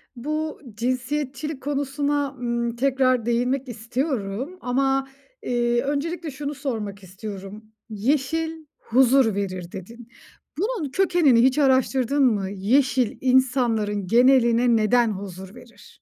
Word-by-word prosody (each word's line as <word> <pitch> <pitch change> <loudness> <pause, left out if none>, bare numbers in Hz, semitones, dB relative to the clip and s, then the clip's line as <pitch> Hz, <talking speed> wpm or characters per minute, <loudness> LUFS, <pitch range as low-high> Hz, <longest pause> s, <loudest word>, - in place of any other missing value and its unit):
Bu 305 +5 -4
cinsiyetçilik 260 +4 -3
konusuna, 285 0 -1
ımm, 235 -1 -2
tekrar 255 -2 +2
değinmek 250 +3 0
istiyorum 245 - -3
ama, 270 +2 0 0.4
eee, 240 - +1
öncelikle 305 +4 -3
şunu 290 +2 -5
sormak 220 -8 -5
istiyorum. 195 +2 -9 0.2
"Yeşil 305 +8 -1
huzur 250 -2 +3
verir." 185 -3 -4
dedin. 225 +5 -10 0.5
Bunun 400 - -2
kökenini 335 -9 +4
hiç 260 +2 +3
araştırdın 265 0 +2
mı? 205 -7 +2
Yeşil 245 +5 +1
insanların 240 -6 +1
geneline 240 +1 +4
neden 230 +1 +3
huzur 190 0 -8
verir? 245 -1 -17
250 Hz, 105 wpm, -23 LUFS, 225-275 Hz, 0.5 s, kökenini